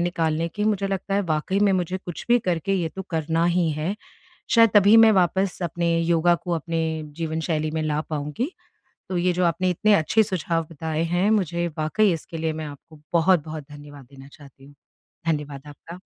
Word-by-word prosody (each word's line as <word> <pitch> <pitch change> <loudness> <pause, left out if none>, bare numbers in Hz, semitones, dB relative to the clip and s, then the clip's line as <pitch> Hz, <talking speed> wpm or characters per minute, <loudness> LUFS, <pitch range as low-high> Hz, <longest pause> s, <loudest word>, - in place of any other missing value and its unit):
निकालने 165 -2 0
के 210 +5 -3
मुझे 205 -2 +1
लगता 195 0 -3
है 200 - +2
वाक़ई 155 +5 0
में 205 -1 +4
मुझे 185 -1 -1
कुछ 175 -2 -8
भी 240 0 +5
करके 180 -3 -1
ये 175 -3 -1
तो 190 - -4
करना 165 0 0
ही 175 -1 +2
है। 155 +6 -2 0.6
शायद 230 -2 +6
तभी 205 +2 +7
मैं 225 -1 +8
वापस 190 0 +1
अपने 170 0 0
योगा 170 +1 +3
को 170 +1 -5
अपने 165 +1 -2 0.4
जीवनशैली 160 -1 -2
में 160 0 -2
ला 150 -1 -1
पाऊँगी। 150 - -3 0.6
तो 185 - -3
ये 180 +1 +2
जो 180 +1 0
आपने 175 +2 +1
इतने 210 +4 +3
अच्छे 205 +5 +3
सुझाव 170 -4 -2
बताए 160 0 -3
हैं 175 +5 +1
मुझे, 175 -5 0
वाक़ई 180 +6 +2
इसके 165 0 -6
लिए 160 0 -1
मैं 155 0 -5
आपको 150 +1 -13
बहुत-बहुत 160 -3 +1
धन्यवाद 145 -1 -12
देना 135 0 -13
चाहती 140 -2 -16
हूँ। 145 +1 -16 0.5
धन्यवाद 145 -3 -2
आपका। 165 +4 -11
170 Hz, 185 wpm, -23 LUFS, 155-185 Hz, 0.6 s, मैं